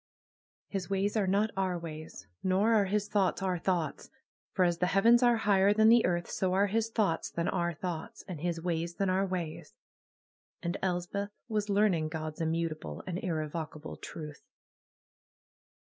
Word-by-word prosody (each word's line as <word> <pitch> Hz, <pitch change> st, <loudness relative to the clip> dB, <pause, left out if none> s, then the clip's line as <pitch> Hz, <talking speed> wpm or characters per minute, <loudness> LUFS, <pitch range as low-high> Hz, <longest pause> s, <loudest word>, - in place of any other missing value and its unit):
''His 195 Hz, -2 st, -3 dB
ways 195 Hz, +2 st, 0 dB
are 205 Hz, -3 st, +2 dB
not 205 Hz, +3 st, +2 dB
our 190 Hz, -2 st, 0 dB
ways; 155 Hz, -2 st, -8 dB, 0.2 s
nor 195 Hz, +5 st, +3 dB
are 210 Hz, -3 st, +4 dB
His 205 Hz, +1 st, 0 dB
thoughts 195 Hz, -2 st, +1 dB
our 185 Hz, -2 st, 0 dB
thoughts; 175 Hz, -4 st, -1 dB, 0.4 s
for 185 Hz, -, +3 dB
as 170 Hz, -1 st, +1 dB
the 180 Hz, -, +2 dB
heavens 230 Hz, +6 st, +5 dB
are 240 Hz, -1 st, +5 dB
higher 200 Hz, -2 st, +4 dB
than 220 Hz, +1 st, +6 dB
the 235 Hz, 0 st, +6 dB
earth, 175 Hz, -1 st, -1 dB
so 185 Hz, -1 st, -1 dB
are 195 Hz, +2 st, +4 dB
His 225 Hz, +2 st, 0 dB
thoughts 205 Hz, -8 st, 0 dB
than 170 Hz, 0 st, -2 dB
our 175 Hz, -2 st, 0 dB
thoughts, 180 Hz, +7 st, -5 dB
and 175 Hz, -6 st, -6 dB
His 170 Hz, -1 st, -1 dB
ways 170 Hz, 0 st, -2 dB
than 195 Hz, -2 st, +1 dB
our 190 Hz, +1 st, +1 dB
ways.^' 175 Hz, -4 st, -5 dB, 0.9 s
And 170 Hz, -, -1 dB
Elspeth 185 Hz, +2 st, -1 dB, 0.2 s
was 215 Hz, -2 st, -1 dB
learn 205 Hz, 0 st, +4 dB
ing 155 Hz, -2 st, 0 dB
Gods' 155 Hz, 0 st, -5 dB
immutable 160 Hz, -, -2 dB
and 180 Hz, -1 st, -3 dB
irrevocable 155 Hz, -2 st, -4 dB
truth. 150 Hz, -2 st, -8 dB
185 Hz, 165 wpm, -31 LUFS, 165-200 Hz, 0.9 s, than